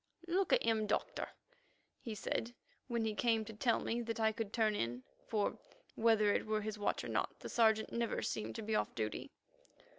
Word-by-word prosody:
"Look 365 +2 +1
at - - +5
him, 220 -2 +2
Doctor," 205 - -1 0.7
he 225 -4 -5
said 230 +3 -2 0.3
when 235 -3 0
he 220 - 0
came 225 -1 +2
to 220 - -7
tell 230 +2 +2
me 235 +1 -1
that 230 -1 -3
I 220 0 +4
could 220 -1 -4
turn 220 -2 +2
in, 120 - -2 0.2
for 210 -2 0 0.3
whether 220 -2 +4
it - - 0
were 215 0 +1
his 215 0 -4
watch 205 - 0
or - - -4
not, - - -1
the - - -6
Sergeant 220 -2 +3
never 235 -1 0
seemed 215 - -2
to 225 - -4
be 220 +1 -2
off - - 0
duty. 110 -2 -2
220 Hz, 200 wpm, -36 LUFS, 215-230 Hz, 0.7 s, at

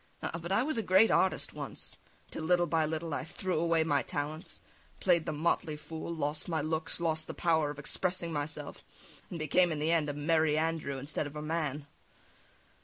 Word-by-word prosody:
Ah! 170 - -3
but 170 +3 -5
I 205 +5 +4
was 280 -4 0
a - - +2
great 190 +2 +5
artist 190 - +2
once, - - -7 0.3
till - - -5
little 175 +1 +4
by 160 -1 +2
little 160 0 -3
I - - -1
threw 175 +1 -2
away 165 -1 +3
my 145 -3 +2
talents, 150 +6 -4 0.4
played 175 -3 +3
the - - +1
motley 155 +1 0
fool, 160 +2 -6
lost 155 0 -2
my 160 -2 +1
looks, 160 +3 -2
lost 160 -2 0
the - - -6
power 160 -3 +2
of 145 - -6
expressing 170 +3 -1
myself, 145 0 -4 0.5
and 175 - -5
became 170 +3 +3
in 155 - -1
the 155 +2 +1
end 160 -3 +2
a - - -1
Merry 155 +1 +2
Andrew 160 -3 -1
instead 145 +2 -3
of 145 - -10
a 150 - -4
man. 155 -3 -2
160 Hz, 195 wpm, -32 LUFS, 150-170 Hz, 0.5 s, great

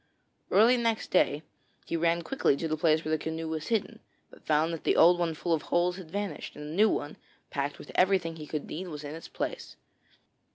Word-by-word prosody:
Early 230 +5 +5
next 230 -2 -1
day 150 -4 +2 0.4
he - - -3
ran 170 +1 +1
quickly 265 - +1
to 165 - -2
the 155 - 0
place 155 0 +2
where 155 - -2
the 155 - +1
canoe 160 0 -4
was 160 -1 -4
hidden, 225 0 -1 0.3
but - - -17
found 155 +2 +2
that 165 - -6
the - - +2
old 175 +2 +6
one 165 -2 0
full 170 +2 -1
of 160 - +1
holes 180 +1 +1
had 180 -4 -10
vanished, 200 +2 -4
and 150 - -8
a 150 - -6
new 215 +3 +5
one, 145 -5 -3 0.3
packed 140 0 -2
with - - -11
everything 180 -3 +2
he 155 -1 -8
could 150 -1 -4
need, 180 +4 -6
was 150 -3 -7
in 145 0 -6
its 165 - -8
place. - - -5
165 Hz, 220 wpm, -29 LUFS, 155-185 Hz, 0.4 s, old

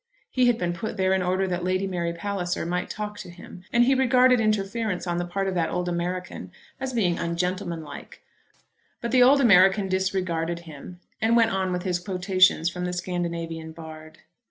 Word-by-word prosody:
He 255 -1 +3
had 240 -2 +3
been 175 -3 -1
put 215 +5 -5
there 190 0 +2
in 190 - +1
order 185 +1 0
that 180 -1 -2
Lady 185 +1 0
Mary 175 -3 -2
Palliser 175 0 -3
might 180 +1 -2
talk 210 -1 -5
to - - -8
him, 175 +1 -12
and 240 0 +4
he 270 - +4
regarded 255 -1 +4
interference 215 -2 -1
on 175 -1 -2
the 175 - -3
part 195 +2 -2
of 190 - -1
that 170 -2 0
old 180 0 -2
American 175 - -4 0.3
as 265 0 -3
being 190 -8 0
ungentlemanlike. 170 -1 -4 0.8
But 235 - -4
the 255 - +4
old 270 +3 +6
American 195 -4 +5
disregarded 185 -3 -1
him, 165 +2 -11 0.2
and 225 +1 +3
went 225 -1 +4
on 190 -2 -1
with 180 0 -2
his 180 -2 -1
quotations 185 -2 +2
from 180 +1 -3
the 180 - -3
Scandinavian 170 -3 -4
bard. 155 -1 -11
185 Hz, 185 wpm, -25 LUFS, 175-205 Hz, 0.8 s, old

